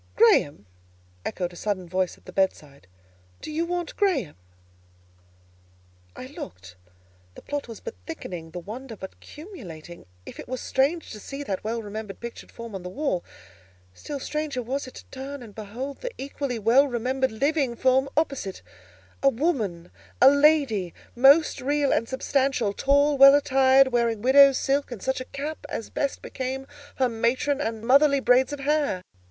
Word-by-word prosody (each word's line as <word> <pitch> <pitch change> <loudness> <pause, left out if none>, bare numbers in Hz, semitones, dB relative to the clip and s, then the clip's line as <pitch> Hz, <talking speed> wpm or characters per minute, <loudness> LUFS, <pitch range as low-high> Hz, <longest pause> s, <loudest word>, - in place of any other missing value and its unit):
"Graham!" 390 - +4 0.6
echoed 180 -1 -3
a - - -12
sudden 185 -1 -3
voice 185 +1 -1
at - - -26
the 185 - -11
bedside. 150 - -2 0.5
"Do - - -7
you 330 +2 -1
want 350 -1 -3
Graham?" 300 - 0 1.8
I - - -8
looked. 95 - -10 0.6
The - - -12
plot 290 -2 -4
was 230 -3 -9
but - - -6
thickening; 165 0 -7
the 170 - -9
wonder 225 +7 -7
but 190 -2 -9
culminating. 175 - -11 0.2
If - - -10
it - - -8
was 255 0 -4
strange 285 +8 0
to 215 - -8
see 275 +7 -7
that 195 -8 -4
well 225 +1 -3
remembered 210 -1 -7
pictured 235 0 -9
form 230 -2 -9
on 190 - -5
the 180 - -7
wall, 255 - -2 0.7
still 285 - -6
stranger 300 -2 -3
was 265 +3 -3
it 255 - -12
to - - -11
turn 270 0 -7
and 215 -3 -12
behold 230 +7 -7
the - - -3
equally 275 -2 -4
well 235 +6 +4
remembered 260 +1 -1
living 275 +1 0
form 260 +2 +2
opposite—a 275 -1 -3
woman, 225 - -2 0.3
a 265 - +8
lady, 280 - +3 0.2
most 275 +6 +5
real 285 +1 +1
and 230 - 0
substantial, 260 -5 0
tall, 285 +3 +2
well 275 +1 +10
attired, 270 -2 +4
wearing 235 -3 0
widow's 275 +1 +7
silk, 280 +1 0
and 230 -5 -7
such 265 -1 -1
a - - -6
cap 290 +4 -6
as 225 - -5
best 280 -2 -2
became 265 +1 -4 0.3
her 260 - +2
matron 245 +5 0
and 225 -4 -3
motherly 280 +3 +5
braids 260 +1 +3
of 290 -1 -5
hair. 285 -10 0
260 Hz, 160 wpm, -25 LUFS, 215-280 Hz, 1.8 s, well